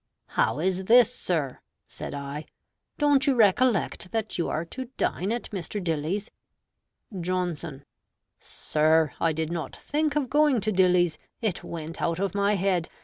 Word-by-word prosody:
"How - - +1
is 185 +3 0
this, 240 +2 +6
sir?" 160 - -1 0.3
(said - - -7
I). 140 +2 -6 0.5
"Don't 290 -2 +3
you 275 - +4
recollect 210 -4 +2
that 220 -1 -2
you 170 - -1
are 160 +2 -2
to 260 +9 -6
dine 190 +4 0
at 240 +1 -3
Mr. 195 +1 -4
Dilly's?" 165 +6 -2 0.9
Johnson 170 -5 -3 0.5
Sir, 155 -1 +1
I 165 - +2
did 160 +1 -2
not 170 -2 -4
think 300 0 -1
of 290 -3 +1
going 295 -2 +3
to 215 +2 0
Dilly's: 180 -4 +3 0.2
it 215 -6 -2
went 165 0 -6
out 165 -1 0
of 195 -1 -1
my 200 +1 +2
head. 185 -3 0
185 Hz, 150 wpm, -26 LUFS, 160-225 Hz, 0.9 s, this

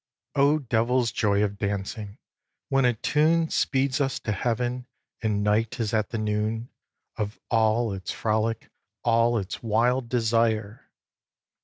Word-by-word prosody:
vii. 140 - +3
O 145 +2 +5
devil's 125 -2 +1
joy 100 -1 +2
of 100 -1 -2
dancing, 100 +1 -3 0.5
when 135 -1 +3
a 125 - +4
tune 160 +7 +2
Speeds 135 +1 +1
us 135 -2 0
to 110 - -2
Heaven, 120 +4 -1 0.3
and 105 -2 0
night 105 +3 +1
is 110 -2 -1
at 110 -2 +1
the 115 - -3
noon 110 +2 -1 0.5
Of 105 0 -3
all 115 -1 +2
its 95 -1 -5
frolic, 110 0 -1 0.3
all 115 0 +3
its 100 -1 -4
wild 120 +3 +1
desire! 115 -2 0
115 Hz, 140 wpm, -26 LUFS, 105-125 Hz, 0.5 s, O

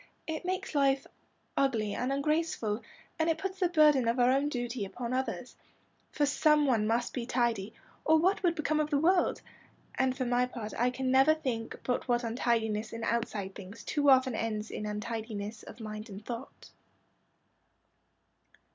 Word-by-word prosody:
It 320 +2 -4
makes 370 -2 -2
life 275 -1 +2 0.5
ugly 225 -7 +1
and 255 +2 -1
ungraceful, 280 -6 0 0.4
and 320 +1 +2
it 325 - +2
puts 380 +2 -4
the 360 -3 +2
burden 300 -7 +5
of 230 +2 +1
our 245 +1 +5
own 275 +2 +2
duty 240 -6 -3
on 245 0 -3
others. 255 -1 -3 0.6
For 295 - +1
some 300 +1 +3
one 225 -6 +2
must 235 +2 0
be 240 -2 -4
tidy, 230 -4 0 0.3
or 315 0 +5
what 370 +5 +2
would 345 -3 +2
become 305 -1 0
of 305 0 0
the 290 - +2
world? 350 +5 +2 0.5
And 260 0 0
for 260 - -1
my 245 +1 +2
part 225 -4 -6
I 245 +1 +2
can 255 +1 -2
never 270 +4 +6
think 245 -7 -4
but 250 +1 -1
what 240 -1 +1
untidiness 225 -2 0
in 230 0 -5
outside 215 -5 -1
things 200 +3 -10
too 290 -1 +2
often 260 -1 +5
ends 220 -1 -3
in 210 - -4
untidiness 215 0 -4
of - - -12
mind 215 -1 -7
and 200 +1 -9
thought." 240 +2 -8
250 Hz, 170 wpm, -30 LUFS, 225-290 Hz, 0.6 s, never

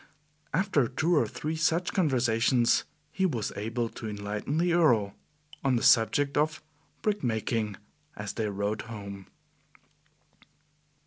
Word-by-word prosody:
After 165 - +2
two 160 +7 +1
or 150 - +3
three 155 +2 -4
such 165 +2 +1
conversations, 120 - +2 0.3
he 190 +3 +1
was 120 - -2
able 115 +3 -2
to 110 - -7
enlighten 105 +7 -3
the 175 +1 +2
Earl 120 - +3 0.5
on 135 -2 +2
the 115 - 0
subject 140 +6 +4
of 155 +2 +1 0.4
brick 210 -5 0
making, 110 -3 -1 0.4
as - - -5
they 110 -1 -2
rode 100 +1 -2
home. 100 -3 -8
120 Hz, 125 wpm, -28 LUFS, 110-155 Hz, 0.5 s, subject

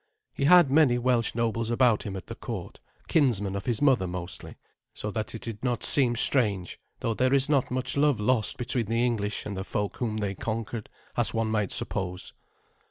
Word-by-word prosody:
He 140 - -2
had 175 -3 +6
many 140 -5 +4
Welsh 120 -2 0
nobles 115 -1 -1
about 120 -2 +3
him 100 -2 -6
at 95 - -7
the - - -7
court, - - -7 0.3
kinsmen 105 -10 +1
of 100 - -5
his 120 +1 0
mother 130 -10 +3
mostly, 90 0 -7 0.4
so 105 - -5
that 110 +1 -4
it 110 - -8
did 115 -1 -7
not 125 -2 -1
seem 125 -4 +3
strange, 105 -8 +3 0.2
though 115 - 0
there 130 +4 +2
is 135 -1 +2
not 140 -4 +2
much 130 0 -1
love 140 -4 +2
lost 110 0 +2
between 120 -2 -1
the 115 +2 +1
English 105 -4 -2
and 100 - -5
the 95 - -4
folk 105 -1 -3
whom 110 -3 -2
they 100 -2 -2
conquered, 110 +2 -5 0.3
as - - +1
one 115 -1 0
might 105 -3 0
suppose. 90 -1 -3
115 Hz, 195 wpm, -27 LUFS, 105-125 Hz, 0.4 s, had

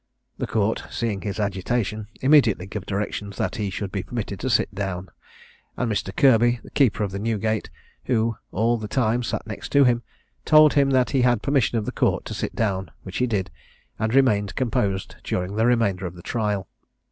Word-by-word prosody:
The - - -2
Court, - - 0
seeing 105 -4 -2
his 100 0 -4
agitation, 105 +2 -1
immediately 130 -9 +4
gave 100 0 -6
directions 100 0 -3
that - - -2
he 105 -2 -1
should 95 +1 -4
be 100 - -2
permitted 105 -2 -5
to 130 - -2
sit 110 -3 +2
down; 95 -2 -4 0.7
and 125 -3 0
Mr. 100 -2 -1
Kirby, 120 -3 +4
the - - -13
keeper 120 -6 +2
of 100 -2 -3
Newgate, 110 +1 -1 0.4
(who 115 -2 +1 0.2
all 115 +4 +1
the 110 - -5
time 120 0 +1
sat 115 - -3
next 105 -3 -7
to 140 0 +7
him,) 120 -2 +3 0.4
told 155 -1 +6
him 140 -2 +4 0.2
he 135 - +2
had 120 -3 +2
permission 135 -4 +2
of 110 - -1
the - - -3
Court - - 0
to - - -5
sit - - -4
down, 95 -5 -1
which 95 - -6
he 125 - +1
did, 95 -5 -1 0.5
and 110 +3 0
remained 105 -7 +3
composed 100 -6 -1
during 90 +2 -2
the 110 +2 +2
remainder 100 -7 +1
of 85 - -9
the 85 - -12
trial. 105 -5 -1
110 Hz, 190 wpm, -24 LUFS, 100-120 Hz, 0.7 s, to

